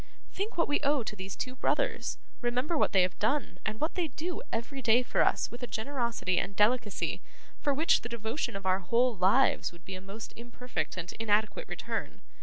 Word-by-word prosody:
Think 400 +1 -3
what 335 - +3
we 290 - +2
owe 285 -3 +2
to 215 - -4
these 190 -1 -6
two 255 - -3
brothers: 480 - 0 0.2
remember 250 +6 0
what - - +3
they 190 -2 +5
have 180 -1 -2
done, 255 +7 0
and 215 0 -3
what 310 - 0
they 355 -3 0
do 320 +5 -4
every 250 +4 -3
day 235 +1 +5
for - - +1
us - - +1
with 240 - -8
a 245 - -3
generosity 235 -7 0
and 200 - -3
delicacy 210 -1 +2 0.4
for 290 - +1
which 305 +4 +4
the 240 - -6
devotion 230 +2 -2
of 195 -1 -5
our 185 0 +3
whole 235 +6 +2
lives 195 +9 +4
would 170 +1 -17
be 190 - -6
a 185 - -6
most 200 +3 -8
imperfect 240 -8 -4
and 180 -1 -4
inadequate 220 - +1
return. - - -4
235 Hz, 205 wpm, -31 LUFS, 200-275 Hz, 0.4 s, they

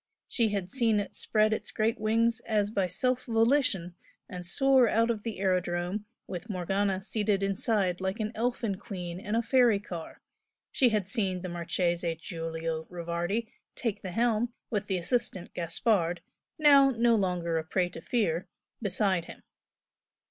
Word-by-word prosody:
She 230 -3 +2
had 195 -3 -3
seen 230 -5 +3
it 205 - -5
spread 215 0 +2
its - - -4
great 220 +1 0
wings 225 +2 +2
as 210 -2 +1
by 195 -4 +1
self 255 +7 0
volition 225 -6 +2 0.3
and 180 -1 -7
soar 260 +6 +4
out 230 +1 +3
of 220 -3 -3
the 225 0 -5
aerodrome 180 +1 0 0.2
with 180 +4 -7
Morgana 195 +1 0
seated 205 -1 0
inside 195 -2 +1
like 190 +4 -2
an 215 0 -1
elfin 230 -4 -1
queen 180 -3 -6
in 210 +2 -3
a 230 - +2
fairy 240 -3 +4
car 175 -5 -8 0.5
she 255 - +4
had 210 -4 0
seen 190 -5 -1
the 185 - -4
Marchese 170 0 -1
Giulio 165 -1 -4
Rivardi 175 +6 -2 0.2
"take 230 -5 -2
the 190 - -5
helm" 230 +3 +1 0.2
with 210 -3 -1
the 190 - 0
assistant 185 0 -2
Gaspard, 175 0 0 0.4
now 280 -3 +7
no 235 -2 +3
longer 180 -5 0
a - - -4
prey 180 +3 0
to 165 - -9
fear, 180 -6 0 0.3
beside 190 -4 +1
him. - - -12
200 Hz, 155 wpm, -29 LUFS, 175-225 Hz, 0.5 s, now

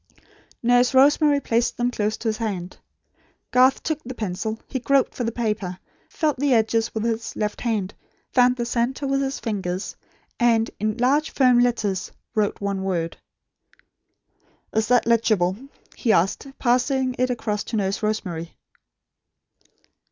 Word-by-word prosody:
Nurse 245 +2 +3
Rosemary 290 +2 +5
placed 235 -3 0
them 245 +1 0
close 215 -2 -1
to 230 - -5
his 215 - -2
hand. 190 -6 -4 0.7
Garth 255 +1 +4
took 310 -2 -1
up - - -35
the 255 +1 -6
pencil. 215 +2 -3
He 260 - -3
groped 270 +2 +2
for 245 - -3
the 230 - -1
paper; 210 -6 -2 0.3
felt 305 -4 0
the 280 -2 +3
edges 225 0 +1
with 220 - -1
his 230 0 -2
left 210 -1 -3
hand; 210 -5 -1 0.4
found 250 -1 +5
the 240 -1 -2
centre 245 +4 -1
with 275 0 +1
his 270 0 -2
fingers; 190 -4 -3 0.4
and, 230 -2 +3
in 215 +1 -1
large 280 +6 +2
firm 250 -3 +4
letters, 220 -6 0 0.2
wrote 210 -3 0
one 200 -1 -2
word. 175 -4 -2 1.6
"Is 220 0 +1
that 245 0 +3
legible?" 215 -6 +2 0.4
he 235 - +1
asked, 195 - +1
passing 255 +1 +1
it 255 0 +2
across 215 -4 -2
to 235 - -4
Nurse 200 -1 -1
Rosemary. 185 -6 -3
230 Hz, 150 wpm, -23 LUFS, 210-250 Hz, 1.6 s, Rosemary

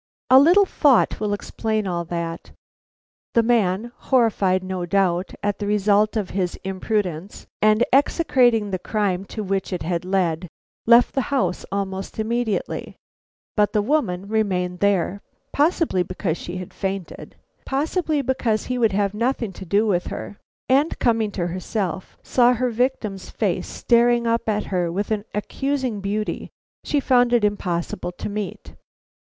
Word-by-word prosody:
A 260 - +10
little 355 +8 +6
thought 285 - +3
will 210 -1 -1
explain 215 +1 -2
all 175 -2 -2
that. 170 0 -5 0.9
The 230 - +5
man, 225 -1 +1
horrified, 205 -7 +2
no 185 -1 -3
doubt, 180 0 0
at 205 -1 -1
the 205 - -3
result 210 +1 +2
of 205 -4 -2
his 180 -2 -1
imprudence, 190 -2 -3 0.2
and 215 +2 +4
execrating 250 - +3
the 185 - -2
crime 195 -2 -1
to 215 +2 -6
which 195 0 -2
it 180 -3 -3
had 170 +1 -2
led, 180 -2 0 0.4
left 235 +1 +6
the 270 - +1
house 190 -11 0
almost 195 -1 -4
immediately. 225 0 -2 0.6
But 210 -1 +2
the 210 - +3
woman 205 -9 0
remained 185 -5 -1
there, 200 -1 +1 0.3
possibly 300 - +2
because 180 -1 -2
she 175 +1 -6
had 185 -1 -8
fainted, 195 -2 -5 0.3
possibly 305 +1 0
because 240 -4 0
he 250 0 -2
would 225 -4 +3
have 200 0 +1
nothing 230 -2 -1
to 190 - -9
do 200 +5 +2
with 180 -5 0
her; 205 - -7 0.3
and 280 +5 +2
coming 225 -3 +1
to 175 - -2
herself, 185 +1 -4
saw 245 -1 +4
her 250 +1 -1
victim's 225 -5 -2
face - - -1
staring 240 0 +2
up 230 -1 0
at 210 0 0
her 175 -2 0
with 200 +5 -3
an 210 -1 -1
accusing 260 +1 -2
beauty 210 +2 -3 0.3
she 290 - +1
found 245 -3 +3
it 235 -3 +3
impossible 175 -3 -2
to 180 - -6
meet. 205 -1 -5
210 Hz, 150 wpm, -22 LUFS, 185-240 Hz, 0.9 s, A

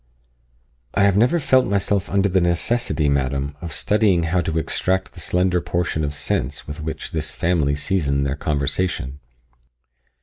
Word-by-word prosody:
"I 100 - +3
have 100 -1 +4
never 125 +11 +3
felt 130 -3 +3
myself 100 0 0
under 100 0 +2
the 95 -1 +2
necessity, 85 -2 +1
madam, 70 0 0
of 85 - -6
studying 100 +1 +2
how 85 +2 +1
to 80 -1 -2
extract 95 +3 -1
the - - -10
slender 90 0 +1
portion 85 -2 -1
of 75 0 -2
sense 70 -1 -2
with 75 +1 -6
which 80 +1 -5
this 75 -2 -3
family 80 -5 +1
season 70 -3 0
their 70 0 -1
conversation." 70 -1 -1
85 Hz, 155 wpm, -21 LUFS, 70-95 Hz, -, have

